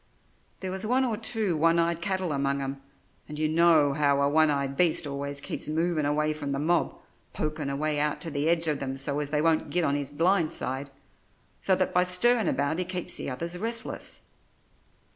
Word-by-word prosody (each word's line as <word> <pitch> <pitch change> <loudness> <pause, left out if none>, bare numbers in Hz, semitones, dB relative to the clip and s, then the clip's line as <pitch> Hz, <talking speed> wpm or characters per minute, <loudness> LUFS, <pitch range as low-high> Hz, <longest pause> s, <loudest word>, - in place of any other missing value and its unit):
There 190 -1 -4
was 190 0 -3
one 255 +4 +2
or 235 -3 -1
two 220 -4 0
one 165 +2 +3
eyed 170 0 +1
cattle 185 -1 -1
among 140 0 0
'em 135 0 -5 0.5
and 150 - -7
you 155 0 +1
know 160 -3 +4
how 140 -1 +2
a 140 - +3
one 155 +2 +3
eyed 140 -1 -1
beast 170 -1 +3
always 140 0 -3
keeps - - -3
movin' 160 -1 0
away 150 +1 +1
from 145 -2 -4
the - - -1
mob, 165 +4 0 0.4
pokin' 150 -2 -3
away 150 +2 -1
out 150 0 0
to 165 - -3
the 145 +2 0
edge 170 -1 +1
of 150 -2 0
them 135 -1 -4
so 140 +2 -2
as 145 -1 -2
they 150 0 0
won't 165 -1 +1
git 175 0 0
on 140 - +1
his 145 -1 -2
blind 165 +3 +1
side, 130 +2 -2 0.7
so 190 - +3
that 185 0 -1
by 180 - +4
stirrin' 210 +4 +3
about 145 +4 -1
he - - +1
keeps 180 -1 -2
the - - -3
others 170 +7 -5
restless. 230 +2 -2
155 Hz, 205 wpm, -27 LUFS, 140-175 Hz, 0.7 s, know